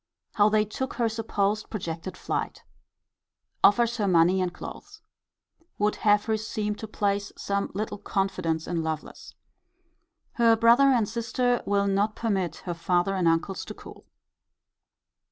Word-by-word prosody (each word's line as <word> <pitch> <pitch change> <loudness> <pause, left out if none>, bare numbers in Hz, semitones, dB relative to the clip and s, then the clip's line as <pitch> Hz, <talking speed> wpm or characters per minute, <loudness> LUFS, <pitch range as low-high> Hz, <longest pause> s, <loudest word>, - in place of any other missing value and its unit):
How 205 0 +4
they 215 0 +2
took 265 +5 -5
her 235 -2 +1
supposed 215 -2 -1
projected 175 -2 -5
flight. - - -4 1.0
Offers 235 +3 +4
her 205 -3 0
money 180 +1 +4
and 180 -1 -1
clothes. 415 - -10 0.8
Would 210 +1 +1
have 205 -1 +3
her 220 -1 +1
seem 210 -1 -3
to 220 - -7
place 200 -1 -1
some 200 0 -2
little 205 0 -3
confidence 185 -6 -1
in 170 -2 -2
Lovelace. 160 -1 -6 1.0
Her 230 -1 +4
brother 235 +4 +5
and 240 -6 +3
sister 240 +2 0
will 200 0 +2
not 200 +2 +1
permit 190 -8 -1
her 175 - -2
father 175 +2 0
and 185 -3 +1
uncles 165 +4 0
to - - -8
cool. - - -13
205 Hz, 140 wpm, -26 LUFS, 185-220 Hz, 1.0 s, brother